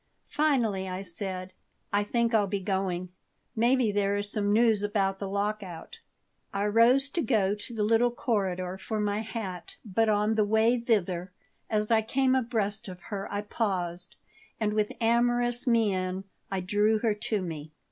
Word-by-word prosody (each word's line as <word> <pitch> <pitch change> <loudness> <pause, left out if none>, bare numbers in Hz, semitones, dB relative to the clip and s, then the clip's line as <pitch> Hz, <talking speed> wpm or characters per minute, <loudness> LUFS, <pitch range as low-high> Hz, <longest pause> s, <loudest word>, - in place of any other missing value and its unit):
Finally 240 -11 +1
I 185 +1 -4
said: 185 0 -5 0.4
"I 205 0 +3
think 235 +2 0
I'll 210 -2 +3
be 200 +1 -2
going. 185 -2 -2 0.5
Maybe 240 0 +3
there 200 0 +1
is 205 0 +3
some 205 -1 +1
news 220 -1 +4
about 195 -2 0
the 195 - -4
lockout." 200 -4 -4 0.5
I 200 0 -1
rose 235 +6 +5
to 340 - 0
go 205 -9 +2
to 210 +3 -6
the 215 - 0
little 230 +3 +4
corridor 190 -6 -2
for 215 +1 -3
my 205 0 0
hat, 215 -5 -6
but 220 +2 +1
on 210 +1 +2
my 220 - +2
way 220 +3 +3
thither, 190 -6 0 0.4
as 210 0 0
I 225 -1 +5
came 260 +4 +1
abreast 225 -5 -1
of 180 -1 -8
her, 195 -1 -4
I 205 0 -1
paused, 180 -5 -2 0.4
and 210 -2 0
with 210 -1 +1
amorous 240 +2 +2
mien 190 -5 +1 0.3
I 195 -1 -2
drew 210 +4 +2
her 220 0 +1
to 210 -1 -2
me. 155 -3 -6
210 Hz, 165 wpm, -28 LUFS, 195-225 Hz, 0.5 s, rose